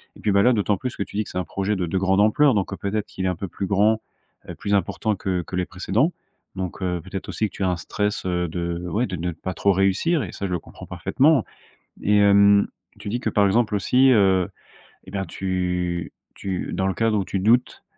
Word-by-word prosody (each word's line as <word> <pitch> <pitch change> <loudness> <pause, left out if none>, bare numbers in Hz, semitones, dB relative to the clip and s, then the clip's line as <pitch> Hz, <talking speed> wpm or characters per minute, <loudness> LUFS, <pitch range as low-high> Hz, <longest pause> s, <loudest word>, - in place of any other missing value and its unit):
Et - - -15
puis, 105 - +1
bah, 100 0 +4
là, 125 - +5
d'autant 105 -2 +1
plus 125 +5 -5
que - - -1
tu - - -13
dis 110 - +1
que - - -12
c'est - - -6
un 90 - 0
projet 100 +5 -2
de 95 -2 -1
de 85 +3 -2
grande 95 +1 +2
ampleur. 130 +7 +4
Donc, 100 -2 -1
heu, - - -5
peut-être 100 +1 -2
qu'il 95 - -5
est - - +2
un 90 - -1
peu 95 - -5
plus 95 - -4
grand, 105 +3 +3 0.5
heu, - - -6
plus 100 - -3
important 105 +2 0
que 95 -2 -2
que 90 - -7
les 90 0 0
précédents. 100 - 0 0.5
Donc, 95 0 -4
heu, 90 -1 -1
peut-être 95 +2 -7
aussi 110 - -1
que - - -17
tu - - -3
as 95 - +2
un 90 - -1
stress, 105 +6 -2
heu, 90 -1 0
de 85 +1 -3
ouais, 115 +7 0
de 95 - -4
ne 90 +1 -2
pas 90 +3 -5
trop 100 +4 +2
réussir 100 - +2
et - - -6
ça, 100 - -4
je - - -6
le 90 - 0
comprends - - -12
parfaitement 140 -3 +2 0.6
et 105 +1 +3
hem, 100 0 +5 0.3
tu 105 0 -7
dis 120 +3 -2
que - - -1
par 105 - +3
exemple, 105 +2 +2
aussi, 125 +7 +4
heu, 95 -5 +3 0.6
et - - -12
bien, 95 -1 -2
tu 90 -1 -2 0.2
tu, 95 -2 -4
dans 95 - -1
le 95 - 0
cadre 110 +3 +1
où 95 - -2
tu 95 - -2
doutes, 115 +6 +2
100 Hz, 250 wpm, -23 LUFS, 90-105 Hz, 0.6 s, là